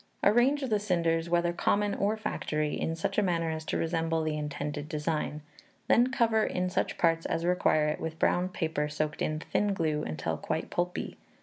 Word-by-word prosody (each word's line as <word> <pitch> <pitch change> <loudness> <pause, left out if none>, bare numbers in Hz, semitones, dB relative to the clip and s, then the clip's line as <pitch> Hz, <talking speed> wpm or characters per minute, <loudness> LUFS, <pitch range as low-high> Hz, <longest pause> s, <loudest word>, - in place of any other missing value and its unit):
Arrange 245 +7 +4
the 220 -5 +1
cinders, 170 -4 0
whether 175 0 +2
common 205 +3 +1
or 210 +2 0
factory, 150 -7 -2
in 165 - -1
such 165 - -1
a - - +4
manner 170 -4 0
as 160 0 -4
to - - -2
resemble 165 -1 0
the 155 -1 -1
intended 150 0 -4
design; 150 0 -2 0.5
then 245 +2 +4
cover 225 -3 +3
in 180 0 -1
such - - -1
parts 165 -1 +2
as 165 +1 -1
require 155 -4 +3
it 150 - -1
with 160 0 -4
brown 180 +2 +2
paper 160 -4 -1
soaked 150 0 -2
in 155 - 0
thin 205 +5 0
glue 155 -4 0
until 80 - -3
quite - - -3
pulpy. 175 0 -2
165 Hz, 185 wpm, -29 LUFS, 155-195 Hz, 0.5 s, Arrange